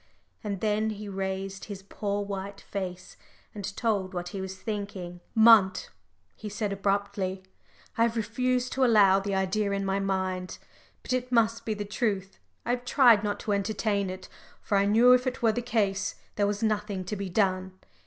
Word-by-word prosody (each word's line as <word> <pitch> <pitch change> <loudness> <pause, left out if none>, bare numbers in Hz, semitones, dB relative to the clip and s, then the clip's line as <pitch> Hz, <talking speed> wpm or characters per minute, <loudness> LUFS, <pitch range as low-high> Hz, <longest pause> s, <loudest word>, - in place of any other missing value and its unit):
And 200 -3 -4
then 215 0 +1
he 210 -1 -6
raised 195 0 -4
his 200 -2 -8
poor 200 +1 -3
white 200 0 -6
face, 185 -2 -6 0.4
and 200 -1 -6
told 200 -5 -1
what 175 0 -3
he 195 +1 -5
was 190 0 -5
thinking. 200 -4 -5 0.2
"Munt," 220 -4 +6 0.5
he 215 - -7
said, 205 0 -2
abruptly, 195 -1 -1 0.6
"I - - +4
have 230 0 +3
refused 250 +3 0
to 265 - +1
allow 205 -5 +6
the 195 0 -2
idea 195 +2 0
in 195 0 -1
my 195 0 0
mind 190 -2 -2 0.5
but - - -3
it 250 0 -2
must 230 -1 +2
be 220 - -1
the 205 0 -4
truth. 200 -3 -2 0.3
I 240 - 0
have 245 0 -1
tried 245 -4 +5
not 205 -1 -2
to 210 - -3
entertain 200 0 0
it, 185 0 -7 0.3
for 205 - -2
I 200 0 +4
knew 235 +4 +6
if 250 +1 +3
it 255 -1 -3
were 225 - +5
the 245 - -2
case, 205 -5 0 0.2
there 205 -1 +2
was 205 +1 -2
nothing 210 -3 -1
to 210 - -3
be 200 -1 -4
done. 185 -1 0
200 Hz, 185 wpm, -28 LUFS, 190-220 Hz, 0.6 s, Munt